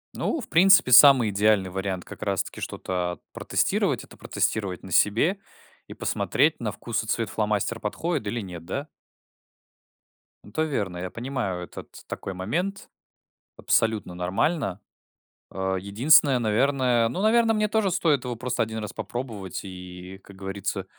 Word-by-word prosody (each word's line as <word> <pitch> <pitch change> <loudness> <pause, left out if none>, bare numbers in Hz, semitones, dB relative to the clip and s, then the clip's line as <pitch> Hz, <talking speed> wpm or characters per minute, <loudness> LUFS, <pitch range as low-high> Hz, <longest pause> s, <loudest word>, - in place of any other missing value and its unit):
Ну, 330 - -1
в - - -9
принципе, 185 -6 +5
самый 125 -3 +8
идеальный 100 -2 +2
вариант 95 -1 -3
как - - -11
раз - - 0
таки - - -10
что-то 90 -1 -3
протестировать- - - 0
это - - -15
протестировать 95 -5 -2
на 95 - -10
себе 115 - +3 0.5
и - - -10
посмотреть, - - +1
на - - -2
вкус 115 -1 -3
и 110 - -10
цвет 115 -2 -1
фломастер 105 +1 -1
подходит 110 +3 -2
или 115 +3 -2
нет. 90 -4 -8
Да? 140 - -4 1.6
Это 115 +10 -2
верно, 105 - -2
я 90 +1 -4
понимаю, 115 -7 -3
этот - - -10 0.2
такой 95 - -5
момент, 170 - -3 0.7
абсолютно 110 -5 +1
нормально. 95 - -1 0.7
А, 95 0 -2
единственное, 125 +8 +4
наверное, 120 +1 +2
ну, 185 - -3
наверно, 225 +1 +4
мне 215 0 +1
тоже 215 -2 +1
стоит 160 -7 +1
его 125 -1 -4
просто 125 0 -2
1 110 0 -2
раз 105 -2 -5
попробовать 110 -7 -5
и, 90 0 -9
как 100 - -14
говорится, 95 +1 -4
110 Hz, 145 wpm, -25 LUFS, 95-135 Hz, 1.6 s, самый